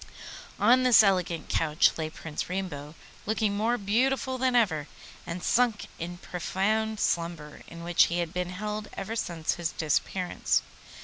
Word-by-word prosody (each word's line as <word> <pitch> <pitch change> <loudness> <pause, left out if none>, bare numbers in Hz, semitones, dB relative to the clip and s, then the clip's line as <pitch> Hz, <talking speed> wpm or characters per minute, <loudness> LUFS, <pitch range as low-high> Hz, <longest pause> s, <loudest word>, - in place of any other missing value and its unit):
On 245 +5 +5
this 250 -4 +7
elegant 180 -4 +1
couch 155 0 +3
lay 160 -1 -3
Prince 155 0 -6
Rainbow, 165 -5 -4 0.3
looking 215 -1 +1
more 225 +4 +1
beautiful 255 +5 0
than 255 -1 +2
ever, 160 -11 +2 0.4
and 175 +1 -5
sunk 235 -3 +2
in 175 +1 -5
profound 210 +5 -1
slumber, 165 -3 -2
in 170 0 -10
which 175 0 +4
he 170 - -2
had 170 -2 -2
been 180 0 -2
held 210 +3 -4
ever 220 +4 -4
since 170 -7 -1
his 170 -2 -3
disappearance. 175 +3 0
185 Hz, 145 wpm, -28 LUFS, 170-220 Hz, 0.4 s, this